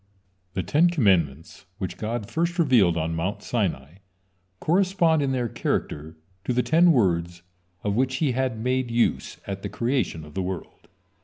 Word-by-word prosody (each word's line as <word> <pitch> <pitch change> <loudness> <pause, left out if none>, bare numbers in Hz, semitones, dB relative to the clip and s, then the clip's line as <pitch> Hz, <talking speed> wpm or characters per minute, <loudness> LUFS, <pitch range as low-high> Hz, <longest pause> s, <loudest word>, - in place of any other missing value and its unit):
The 95 - -1
Ten 165 +4 +3
Commandments, 90 - 0
which 90 -1 -5
God 110 -1 -3
first 170 +2 -1
revealed 120 - +4
on 80 0 -1
Mount 85 +5 -3
Sinai, 90 - -2 0.6
correspond 175 -2 +2
in 140 -1 0
their 125 -2 0
character 80 -6 -3 0.3
to 125 - -1
the 125 +1 +2
ten 165 +8 +5
words 85 - +1 0.4
of 105 - 0
which 130 +2 +1
He 140 0 +1
had 130 -2 -1
made 125 +2 -1
use 115 0 0
at 100 -1 -5
the - - -4
creation 115 - -1
of 75 - -13
the 95 - -2
world. 95 -1 -6
115 Hz, 160 wpm, -25 LUFS, 85-130 Hz, 0.6 s, ten